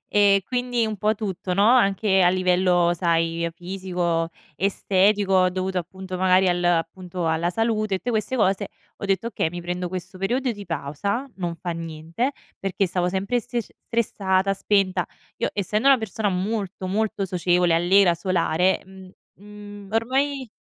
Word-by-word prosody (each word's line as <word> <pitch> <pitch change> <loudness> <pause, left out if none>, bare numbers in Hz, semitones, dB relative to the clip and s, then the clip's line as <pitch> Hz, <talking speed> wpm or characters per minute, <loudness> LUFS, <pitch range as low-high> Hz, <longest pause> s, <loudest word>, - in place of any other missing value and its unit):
E 200 -1 +4
quindi 245 -2 0
un 215 -1 -3
po' 215 +2 +1
tutto, 190 -3 -4
no, 200 +3 +3
anche 200 -5 +4
a 175 - +5
livello, 180 -1 +2
sai, 165 -1 0
fisico, 175 -2 -2 0.3
estetico, 195 +1 +2
ho 185 -1 +4
dovuto 185 +1 -3
appunto 185 +1 -5
magari 185 0 +4
al 175 0 0
appunto 175 +1 -1
alla 160 +2 +1
salute 215 0 0
e - - -5
tutte 245 - -7
queste 220 +3 -1
cose, 200 -3 +1 0.3
ho - - -7
detto: 195 +2 0
"Okay, 205 -8 -1
mi 175 +1 -6
prendo 180 +1 -3
questo 185 0 -6
periodo 245 +7 0
di 205 -3 -7
pausa, 170 - -3
non 175 -3 -3
fa 175 - -5
niente", 165 - -3 0.3
perché 195 0 -1
stavo 180 0 0
sempre 195 +6 0
stresc 240 -1 -4
stressata, 195 -4 0
spenta. 195 -1 +1 0.3
Io - - -1
essendo 210 +6 +1
una 270 -2 +6
persona 220 -1 -2
molto, 195 0 -3
molto 200 0 -1
socievole, 175 -1 +2
allegra, 175 +2 +4
solare, 185 0 +1
mhmm, 190 -1 -13 0.2
mhmm, 205 0 -12
ormai 260 +3 0
190 Hz, 155 wpm, -23 LUFS, 180-210 Hz, 0.3 s, una